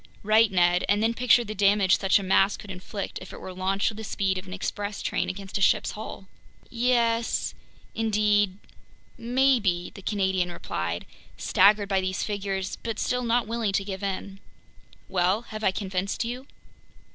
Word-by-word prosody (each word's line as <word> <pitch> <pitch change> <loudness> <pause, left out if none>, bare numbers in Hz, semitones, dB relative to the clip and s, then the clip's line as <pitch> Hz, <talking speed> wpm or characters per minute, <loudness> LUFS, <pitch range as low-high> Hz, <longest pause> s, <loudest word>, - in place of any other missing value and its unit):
"Right, 215 +1 +4
Ned, 175 -1 +3
and 205 +1 +3
then 230 +1 +2
picture 245 0 +4
the 215 -1 -6
damage 200 -1 +3
such 195 - +4
a 200 - -3
mass 195 +1 +3
could 205 - -9
inflict 190 +2 -6
if - - -10
it - - -9
were 185 - -8
launched 190 +3 0
with 215 - -10
the - - -6
speed 195 -3 -1
of 185 - -12
an - - -9
express 205 +1 -4
train - - -1
against 195 +1 -5
a - - -4
ship's - - +3
hull." 210 -2 -8 0.5
"Yes... 235 -1 +1 0.4
indeed... 210 -3 +2 0.6
maybe," 235 -7 +1
the 195 - -10
Canadian 190 -3 0
replied, 85 - -4 0.3
staggered 200 +1 +4
by 195 -1 +2
these 185 0 -2
figures 195 -2 -3
but 225 -2 -4
still 250 +3 0
not 240 +1 +1
willing 225 -2 -1
to 195 - 0
give 190 -1 -5
in. 195 0 -4 0.7
"Well, 185 +3 +1
have 215 -2 -8
I - - +4
convinced 190 +2 -2
you?" 250 +3 -5
200 Hz, 170 wpm, -26 LUFS, 190-220 Hz, 0.7 s, Right